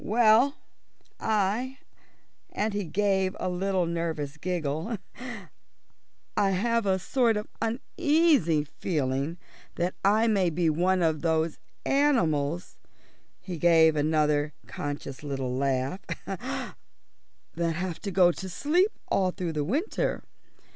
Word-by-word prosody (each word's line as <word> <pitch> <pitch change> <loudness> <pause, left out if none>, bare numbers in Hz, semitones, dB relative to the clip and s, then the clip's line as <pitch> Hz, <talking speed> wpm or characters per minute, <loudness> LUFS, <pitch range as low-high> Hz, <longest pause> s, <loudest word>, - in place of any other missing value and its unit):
"Well, 235 - +4 0.6
I" 220 +5 0 0.7
and 215 0 -1
he 205 -1 -2
gave 190 +2 +1
a - - -2
little 185 0 0
nervous 165 -4 -3
giggle 170 +4 -2 1.4
"I 205 -2 +3
have 230 +3 +1
a 190 -1 +3
sort 230 +3 +1
of 210 - -4
uneasy 270 - +2
feeling 145 0 -2 0.4
that 175 +2 -1
I 210 +3 +4
may 200 -6 +3
be 165 0 +1
one 180 +3 +2
of 160 -2 +1
those 160 -1 0 0.3
animals" 175 - +1 0.6
he 180 -4 -6
gave 160 -2 +5
another 150 0 +1
conscious 145 -2 -5
little 135 -3 -3
laugh 135 +4 0 0.3
"that 170 -1 -6
have 175 0 -4
to 205 - -3
go 180 -2 +5
to 190 +2 -7
sleep 345 - +2 0.2
all 185 -1 +2
through 180 -3 -4
the 150 -1 -1
winter. 285 - -1
180 Hz, 115 wpm, -27 LUFS, 155-210 Hz, 1.4 s, gave